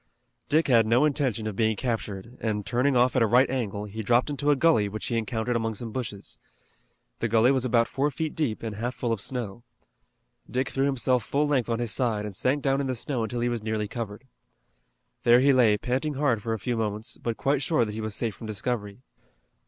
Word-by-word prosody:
Dick 155 +2 +3
had 115 -4 +4
no 120 +6 +4
intention 130 -7 0
of 110 -2 -3
being 110 +1 +2
captured, 115 -1 -4
and, 105 -3 -2
turning 125 +4 +2
off 125 +2 +3
at 130 - +3
a 115 - +4
right 125 +5 +5
angle, 105 -6 -2
he 105 +2 -6
dropped 120 +6 +2
into 145 +1 -1
a 145 - +5
gully 135 -9 +3
which 110 +2 -6
he 120 - -2
encountered 115 +1 -1
among 115 -1 -1
some 115 +1 -5
bushes. 105 -5 -6 0.8
The 115 - 0
gully 115 +3 +4
was 130 -2 +1
about 115 -2 +3
four 140 +2 0
feet 155 +3 -3
deep 135 -10 -1
and 110 -3 -4
half 120 +3 -3
full 120 - -2
of 110 - -4
snow. 120 -3 -4 0.9
Dick 130 +1 -1
threw 135 +1 0
himself 125 -2 +1
full 145 +2 0
length 130 -5 +1
on 115 - 0
his 120 -2 -1
side, 110 -5 0
and 105 -2 -6
sank 135 +8 0
down 135 0 +2
in 135 - -2
the 130 - -1
snow 125 +1 -2
until 120 +2 -2
he 120 - +1
was 120 -2 -2
nearly 110 -1 -2
covered. 110 0 -6 1.0
There 120 0 +6
he 140 +2 +5
lay 115 -5 +4
panting 135 +6 -1
hard 130 -6 +1
for 115 +2 -2
a - - -1
few 120 +4 -2
moments, 110 0 -3
but 115 -2 -3
quite 140 0 +1
sure 150 -6 +2
that 105 - -5
he 110 - -4
was 110 -1 -3
safe 115 -2 -2
from 110 - -9
discovery. 110 0 -3
120 Hz, 225 wpm, -26 LUFS, 110-130 Hz, 1.0 s, There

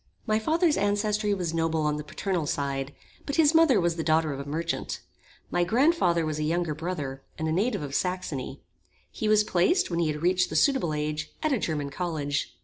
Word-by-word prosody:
My 215 0 +2
father's 320 +7 +2
ancestry 205 +1 +1
was 180 -5 -1
noble 165 -1 0
on 150 0 0
the 150 - -5
paternal 170 +1 -2
side; 140 -1 -2 0.4
but 280 - -1
his 320 -1 +5
mother 320 -9 +5
was 170 -1 0
the 165 - -1
daughter 155 -1 +2
of 135 - -6
a 140 +1 -6
merchant. 160 +3 -3 0.5
My 175 - +2
grand 255 - +3
father 170 - +1
was 155 -1 -2
a - - -1
younger 165 0 0
brother, 150 -4 -4 0.2
and 160 - -2
a - - 0
native 205 +1 0
of 140 -1 -6
Saxony. 160 -7 -3 0.5
He 215 - -3
was 215 0 +5
placed, 210 - +2
when 170 - 0
he 170 - +2
had 150 +1 -3
reached 185 +1 +2
the - - -5
suitable 265 - +2
age, 150 +1 -3
at 310 -2 +2
a 250 - +1
German 150 -5 -2
college. 150 -5 -2
170 Hz, 210 wpm, -27 LUFS, 150-210 Hz, 0.5 s, his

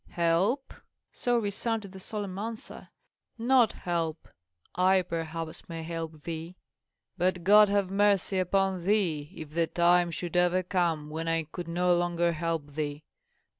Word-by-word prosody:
"Help!" 175 +11 +1 0.4
so 245 -1 0
resounded 215 -1 -2
the 190 - -10
solemn 200 -1 -5
answer; 225 +1 -7 0.5
"not 240 -1 +4
help. 165 -2 -3 0.5
I 185 +1 +3
perhaps 165 -1 -5
may 165 -1 -5
help 160 -2 -6
thee. 165 +1 -6 0.6
But 180 0 +1
God 210 +2 +7
have 200 -2 +1
mercy 200 -1 +2
upon 190 0 +1
thee 175 -7 +1
if 155 -2 -8
the 165 +1 +1
time 175 +1 +3
should 170 +1 -5
ever 180 +1 +3
come 170 -5 -1
when 165 +1 -4
I 165 0 +1
could 170 +3 -8
no 175 +1 +2
longer 175 0 +1
help 165 -3 -3
thee. 150 0 -3
175 Hz, 140 wpm, -29 LUFS, 165-195 Hz, 0.6 s, God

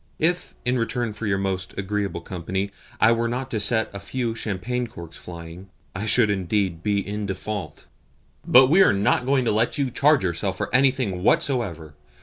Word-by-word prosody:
If, 175 +3 0
in 125 0 +1
return 115 0 -2
for 110 +1 -5
your 95 -1 +1
most 95 -2 -3
agreeable 100 0 -2
company, 95 +2 -4 0.3
I 110 - +5
were 115 0 +1
not 125 +2 -4
to 110 - -1
set 110 +2 +1
a 100 - -6
few 115 +3 -2
champagne 115 +3 -3
corks 85 -8 -10
flying, 85 +2 -10 0.2
I 105 +3 -4
should 110 0 +5
be - - +3
indeed 95 -2 -1
in 105 0 -1
default." 95 -4 -5 0.6
"But 130 +1 +7
we 185 +4 +6
are - - +6
not 105 +5 +1
going 135 -2 +2
to - - +2
let 110 +6 +1
you 135 -3 0
charge 140 +2 +3
yourself 90 +2 -1
with - - -2
anything 130 -8 +2
whatsoever. 90 - 0
105 Hz, 180 wpm, -23 LUFS, 95-125 Hz, 0.6 s, But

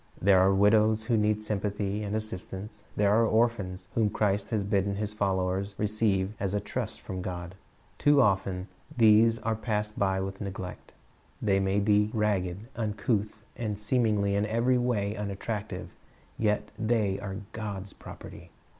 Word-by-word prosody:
There 95 0 +5
are 95 +1 +5
widows 105 +2 +4
who 115 +1 +1
need 105 0 +1
sympathy 105 -1 -2
and 105 0 -3
assistance. 105 -1 -3
There 100 0 +3
are 115 +2 +4
orphans 110 -5 +1
whom 110 -2 +2
Christ 100 -1 0
has 110 -3 0
bidden 100 0 0
His 105 +1 -3
followers 95 -1 -1
receive 105 -2 +1
as 100 0 -1
a - - +2
trust 110 +2 -4
from 95 -3 -5
God. 90 -1 -5 0.5
Too 145 -1 +5
often 95 -4 +1 0.3
these 115 0 +6
are 115 -1 -1
passed 105 -1 -2
by 95 -1 +2
with 95 +1 -5
neglect. 95 -2 -7 0.5
They 95 -2 +2
may 95 +1 +1
be 105 +1 +3
ragged, 100 -1 0
uncouth, 105 -1 -1
and 110 -4 -3
seemingly 105 -2 +1
in 100 +1 +1
every 120 +3 +2
way 105 -4 0
unattractive; 105 +1 -4 0.4
yet 105 -1 0
they 110 -4 +1
are 100 -1 -5 0.2
God's 100 -3 -5
property. - - -11
105 Hz, 150 wpm, -28 LUFS, 100-110 Hz, 0.5 s, these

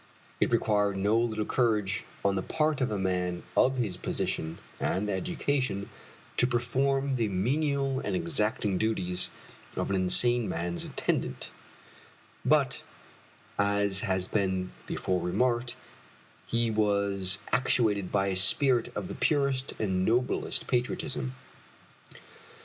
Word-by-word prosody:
It - - +3
required 105 -4 +2
no 100 +3 +2
little 110 -2 +1
courage 105 -6 +1 0.2
on 100 - +4
the 95 - 0
part 155 +5 0
of 130 - +2
a 105 - -1
man 90 -2 -1
of 130 +1 +4
his 105 -8 -1
position 80 -2 -2 0.2
and 100 +3 0
education 130 - -1 0.5
to 125 - +5
perform 135 +3 +1
the 115 -2 +1
menial 135 +6 0
and - - -2
exacting 105 - 0
duties 95 -5 0 0.5
of - - -1
an - - +2
insane 120 +6 +3
man's 85 +1 -2
attendant; - - -2 0.9
but, - - +3 0.8
as 100 -1 +3
has 95 -3 0
been 95 -3 0 0.2
before 90 -1 -1
remarked, 120 +6 0 0.7
he 115 -1 +1
was 100 -3 +1
actuated 110 -6 +2
by 100 -1 +2
a 95 - -1
spirit 120 +6 +3
of 105 -3 -3
the - - -5
purest 140 -3 +1
and 95 -4 0
noblest 120 +5 0
patriotism. 75 - -1
105 Hz, 120 wpm, -29 LUFS, 95-125 Hz, 0.9 s, to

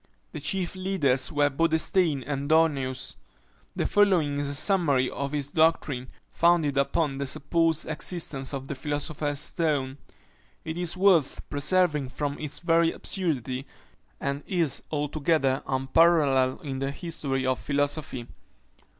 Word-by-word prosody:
The - - -6
chief 180 +4 -1
leaders 175 -9 +1
were 145 -1 +2
Bodenstein 160 0 +1
and 140 0 -3
Dorneus. 135 -5 +1 0.6
The - - -1
following 175 -9 +3
is 145 -1 -2
a 145 - -3
summary 145 -7 +2
of 140 0 -4
his 145 -1 -3
doctrine, 145 -6 +1 0.2
founded 170 -4 +3
upon 140 0 0
the 140 - -1
supposed 165 +4 +1
existence 155 -4 -2
of 135 -2 -5
the 140 - -3
philosopher's 145 +1 -2
stone; 145 -4 -1 0.7
it 160 - -4
is 175 +1 -2
worth 180 -7 +3
preserving 150 -2 +1
from 140 +2 -3
its 150 -1 -4
very 165 -1 +2
absurdity, 135 - -3 0.5
and 140 +1 -2
is 170 -7 0
altogether 150 -2 0
unparalleled 135 -1 +3
in 135 -2 -4
the 135 0 -1
history 140 -4 -3
of 130 0 0
philosophy. 145 -3 -2
145 Hz, 130 wpm, -26 LUFS, 135-165 Hz, 0.7 s, following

